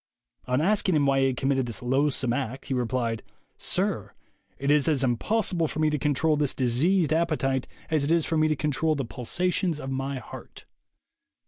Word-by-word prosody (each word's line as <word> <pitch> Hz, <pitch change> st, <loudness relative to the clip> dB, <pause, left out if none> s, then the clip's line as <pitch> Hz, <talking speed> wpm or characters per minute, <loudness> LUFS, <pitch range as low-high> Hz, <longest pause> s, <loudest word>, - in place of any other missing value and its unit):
On 125 Hz, +3 st, +1 dB
asking 190 Hz, 0 st, +2 dB
him 145 Hz, -2 st, +3 dB
why 135 Hz, 0 st, +3 dB
he 135 Hz, -, +3 dB
had 130 Hz, -2 st, -2 dB
committed 135 Hz, -1 st, 0 dB
this 115 Hz, 0 st, -4 dB
loathsome 130 Hz, -1 st, +1 dB
act, 130 Hz, 0 st, -4 dB
he 135 Hz, -, -3 dB
replied: 120 Hz, -2 st, -1 dB, 0.4 s
'Sir, -, -, -1 dB, 0.4 s
it 140 Hz, +1 st, 0 dB
is 150 Hz, 0 st, +3 dB
as 145 Hz, -4 st, +2 dB
impossible 170 Hz, -, +1 dB
for -, -, -6 dB
me 155 Hz, 0 st, +2 dB
to 150 Hz, -, -1 dB
control 150 Hz, +1 st, +2 dB
this 145 Hz, -2 st, 0 dB
diseased 150 Hz, +7 st, +2 dB
appetite 150 Hz, -6 st, 0 dB, 0.2 s
as 155 Hz, -3 st, +2 dB
it 145 Hz, -, 0 dB
is 165 Hz, -2 st, +3 dB
for 165 Hz, -, -1 dB
me 155 Hz, 0 st, +3 dB
to 155 Hz, -, +1 dB
control 150 Hz, +2 st, 0 dB
the 135 Hz, -3 st, -2 dB
pulsations 175 Hz, +7 st, -1 dB
of 135 Hz, -2 st, -5 dB
my 135 Hz, +1 st, -3 dB
heart.' 125 Hz, -, -11 dB
140 Hz, 190 wpm, -26 LUFS, 130-155 Hz, 0.4 s, him